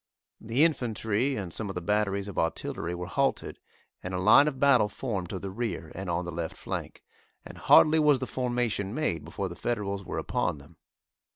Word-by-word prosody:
The 115 +6 +1
infantry 125 -4 0
and 95 -8 -5
some 110 -3 -4
of 95 - -5
the - - -1
batteries 100 +1 0
of 100 - -4
artillery 85 +1 -2
were 90 0 -5
halted, 135 +9 -1 0.4
and 95 0 -5
a - - -1
line 140 +10 +6
of 135 -3 -3
battle 130 -7 +4
formed 100 -7 -4
to 95 - -4
the 95 +1 -6
rear 95 -7 -4
and 95 0 -6
on 85 +1 -1
the 85 - -5
left 85 -1 -5
flank, - - -6 0.4
and - - -10
hardly 160 +1 +6
was 150 -2 +5
the 130 - -3
formation 120 -5 -2
made 155 - -1
before - - -4
the - - -8
Federals 100 -4 -2
were - - -5
upon - - -1
them. 70 +4 -17
105 Hz, 195 wpm, -28 LUFS, 90-125 Hz, 0.4 s, line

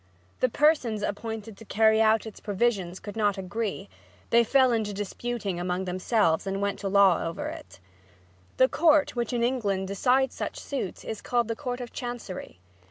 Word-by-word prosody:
The 255 - +2
persons 250 -7 +2
appointed 220 +1 -4
to - - -12
carry 220 +1 +3
out 220 0 +3
its 220 - -9
provisions 195 -4 -1
could 205 0 -8
not 205 -2 +1
agree; 195 - -3 0.4
they 235 0 +6
fell 260 +2 +4
to 220 -3 0
disputing 205 -1 -4
among 180 +1 -2
themselves 185 -1 +1
and 195 0 -2
went 200 0 -1
to 200 - -3
law 195 -3 +4
over 165 - -4
it. 315 - -10 0.8
The 260 - +6
court 305 -1 +3
which 240 -2 -1
in 240 -1 0
England 205 -7 0
decides 255 +6 +2
such - - -5
suits 260 -10 -5
is 220 - -5
called 240 -2 0
the 230 - -1
Court 250 -1 -4
of 240 - -8
Chancery. 240 - -6
220 Hz, 170 wpm, -27 LUFS, 195-245 Hz, 0.8 s, they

